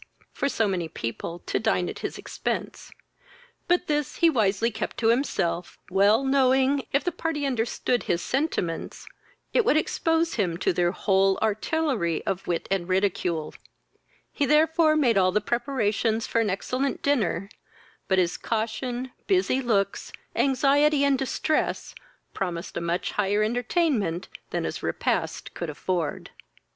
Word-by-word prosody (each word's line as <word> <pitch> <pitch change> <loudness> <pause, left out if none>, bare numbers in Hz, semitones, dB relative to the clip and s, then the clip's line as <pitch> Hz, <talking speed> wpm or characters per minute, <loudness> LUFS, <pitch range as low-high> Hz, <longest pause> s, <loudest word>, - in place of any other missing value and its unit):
for 280 - -1
so 225 -5 +1
many 180 -4 -1
people 155 +4 -5
to - - 0
dine - - +1
at - - -6
his - - -4
expence: - - -4 0.8
but 355 +1 +2
this 295 -3 -1
he 335 -1 +4
wisely 225 -2 +1
kept 220 - -4
to 225 - +2
himself, 180 -9 0
well 200 +6 +4
knowing, 265 0 +3
if 280 - +2
the 355 - 0
part 325 -1 -3
understood 250 -3 0
his 170 - 0
sentiments, 250 - -2 0.5
it 480 - +4
would 310 - +3
expose 325 +1 +1
him 180 -6 0
to - - +1
their 175 0 +2
whole 195 0 +2
artillery 220 - 0
of 195 -1 -3
wit 170 -1 -1
and 190 -2 0
ridicule; 180 -4 0 0.8
he 290 - 0
therefore 310 +2 +4
made 245 -9 +3
all 185 -1 +3
the 210 - +2
preparations 225 -1 0
for 230 - +1
an 220 - 0
excellent 255 +8 -2
dinner, 205 -10 +1 0.6
but 190 - +2
his 180 -1 +1
caution, 240 +3 -3 0.2
busy 370 -9 +2
looks, 200 -5 0 0.2
anxiety, 280 +2 +3
and 280 -2 +3
distress, 275 +3 -1 0.4
promised 175 -3 -4
a - - -2
much 170 +2 -1
higher 205 +1 +1
entertainment 230 - 0 0.2
than - - -2
his - - -4
repast - - -2
could - - -4
afford. 175 -5 -3
230 Hz, 145 wpm, -26 LUFS, 190-280 Hz, 0.8 s, he